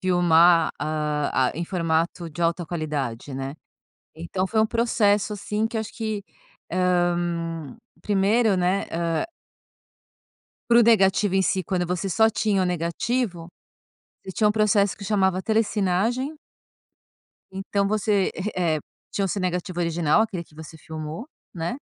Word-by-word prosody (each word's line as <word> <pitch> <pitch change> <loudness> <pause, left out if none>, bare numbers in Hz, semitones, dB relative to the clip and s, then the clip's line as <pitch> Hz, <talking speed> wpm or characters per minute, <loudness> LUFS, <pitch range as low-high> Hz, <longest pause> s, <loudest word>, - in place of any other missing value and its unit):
filmar, 175 -2 +5
ah 150 -3 0
ah, - - -5
em 170 +4 -3
formato 170 -1 -1
de 170 +3 -5
alta 170 +1 +1
qualidade, 145 -6 -4
né. 135 +1 -4 0.6
Então 175 +4 -3
foi 220 +3 +1
um 220 - +4
processo, 215 -3 +1
assim, 210 +1 -2
que 225 - -5
eu - - 0
acho 220 +1 -7
que, 220 -3 -3 0.5
ah, 175 -3 0 0.3
primeiro, 205 +1 +2
né, 180 +2 +1
ah 165 -1 -1 1.5
para 235 - +6
o - - +7
negativo 200 -3 +4
em 190 - +3
si, 190 0 0
quando 180 +1 -1
você 180 +2 -2
só 220 +4 +4
tinha 205 -3 +1
o - - +1
negativo, 180 +2 -2 0.8
você 190 - -7
tinha 210 +2 +2
um - - +2
processo 210 -2 +2
que 200 - -9
chamava 190 -2 +1
Telecinagem 220 - 0 1.1
então 195 +1 -1
você, 210 -2 +1 0.2
eh 170 -4 +1
eh, - - -2 0.3
tinha 200 - -1
o - - -1
seu 195 - -2
negativo 180 -1 -2
original, 165 +1 +2
aquele 190 -6 -4
que 155 - -24
você 160 +1 -10
filmou, 155 - -7 0.3
né. 170 +7 -3
185 Hz, 150 wpm, -24 LUFS, 165-210 Hz, 1.5 s, o